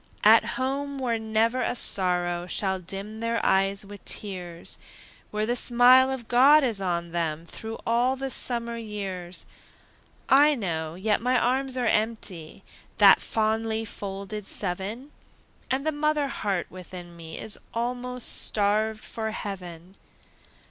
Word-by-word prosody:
At - - +5
home, 275 +2 -2
where 240 -4 -1
never 220 +3 +1
a - - -1
sorrow 175 -4 +1
Shall 190 0 -1
dim 195 +4 -6
their 230 0 -1
eyes 195 +1 +2
with 205 0 -11
tears! 180 -4 -4 0.5
Where 210 0 -1
the 240 +2 0
smile 250 +2 +6
of 260 -4 -4
God 275 +5 +6
is 225 -6 0
on 170 -2 -2
them 165 -1 -2
Through 220 +6 -7
all 240 +3 +2
the 265 0 -4
summer 235 -2 +1
years! 195 -5 -5 0.8
I 290 +2 +6
know, 160 - -3
yet 210 +3 0
my 250 +1 +2
arms 260 +2 0
are 250 - 0
empty, 215 -8 -1 0.3
That - - +7
fondly 220 0 -1
folded 200 0 -6
seven, 205 +9 -3 0.6
And 265 +2 -1
the 315 - +2
mother 300 -1 0
heart 195 -8 -2
within 180 -1 -10
me 160 -1 -9
Is 215 - -4
almost 245 +1 -1
starved 215 +1 0
for 220 -1 -4
heaven. 180 -4 -7
220 Hz, 135 wpm, -26 LUFS, 190-245 Hz, 0.8 s, That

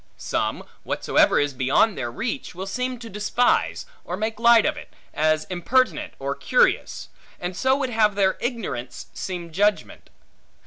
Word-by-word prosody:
Some, - - -2 0.2
whatsoever - - +2
is 145 -1 0
beyond 135 - +2
their 120 - -3
reach, 230 - -4
will 185 +2 -5
seem 250 +5 -3
to 230 -1 -10
despise, 210 +4 0 0.2
or 180 - -5
make 220 +1 -3
light 235 -1 +6
of - - +1
it, - - -11 0.2
as 155 0 +2
impertinent 245 +9 0
or - - -3
curious; - - +1 0.3
and 180 +1 -4
so 260 +6 +2
would 265 -3 -2
have 215 -3 +2
their 195 -1 +2
ignorance 200 - -4
seem 175 -3 -5
judgment. 205 +5 0
210 Hz, 150 wpm, -23 LUFS, 175-240 Hz, 0.3 s, light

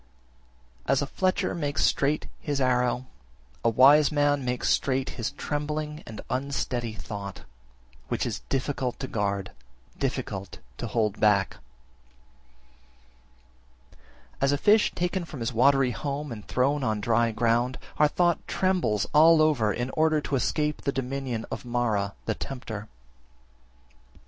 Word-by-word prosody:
As 135 +1 +2
a - - 0
fletcher 185 +5 0
makes 145 -3 -1
straight 145 +2 +1
his 145 -2 -2
arrow, 125 -1 +1 0.6
a 115 - +4
wise 140 +6 +6
man 145 -1 +2
makes 125 0 -1
straight 135 -1 +1
his 115 - -3
trembling 150 +1 -4
and 110 -2 -7
unsteady 130 -3 -2
thought, 100 -3 -7 0.7
which - - -1
is - - -3
difficult 130 -2 -2
to 130 - -4
guard, 100 -4 -2 0.5
difficult 95 -2 -3 0.2
to - - -3
hold 110 -1 0
back. 100 -2 +3 2.8
34. - - -27
As 135 0 +3
a 145 - +2
fish 210 +8 +4
taken 180 +1 -1
from 155 -5 -9
his 115 +2 -2
watery 135 +2 +4
home 145 +2 -4
and 105 -3 -8
thrown 140 +3 +1
on 110 -3 0
dry 115 +2 +2
ground, 120 +3 +1 0.2
our 150 - +5
thought 175 +2 +2
trembles 170 - +1
all 160 +2 +7
over 145 -9 +3
in 120 +4 -3
order 155 -1 +2
to 145 - -2
escape 150 +3 0
the 140 - 0
dominion 135 -3 -3
of - - -5
Mara 115 -5 -1
(the 110 - 0
tempter). 110 -4 -6 1.2
35. - - -33
130 Hz, 140 wpm, -27 LUFS, 115-150 Hz, 2.8 s, all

